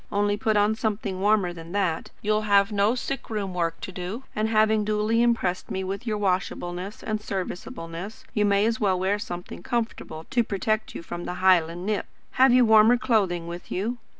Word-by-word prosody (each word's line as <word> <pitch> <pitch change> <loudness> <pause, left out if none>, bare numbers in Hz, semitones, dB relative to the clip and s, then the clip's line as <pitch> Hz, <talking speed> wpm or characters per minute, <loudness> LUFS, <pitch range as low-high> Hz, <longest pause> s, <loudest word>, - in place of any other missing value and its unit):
Only 205 0 +1
put 215 0 +1
on 205 +1 +3
something 215 -4 -2
warmer 200 -3 +2
than 165 +1 -10
that. 185 -6 -1
You 215 - +1
will 215 0 +2
have 200 +1 +4
no 205 +3 +2
sick 270 +2 -4
room 205 -4 -3
work 165 -2 -1
to - - -6
do; 185 +7 -5
and 215 +1 0
having 215 -1 +3
duly 215 +2 +1
impressed 230 -7 +1
me 190 0 -2
with 195 +6 -5
your 215 -1 0
washableness 185 0 -2
and 215 -1 -2
serviceableness, 185 -1 -6
you 210 - +2
may 200 0 +3
as 225 0 0
well 190 -4 +2
wear 195 +3 +1
something 175 -3 -7
comfortable 225 -8 -3
to 245 -3 +3
protect 215 +1 -2
you - - -6
from 175 +1 -6
our 180 - -3
Highland 175 -2 +3
nip. 210 -1 -1 0.2
Have 260 0 +5
you 250 0 +6
warmer 220 +2 +6
clothing 195 -9 +1
with 170 +1 -8
you?" 225 +6 -2
205 Hz, 195 wpm, -25 LUFS, 180-220 Hz, 0.2 s, you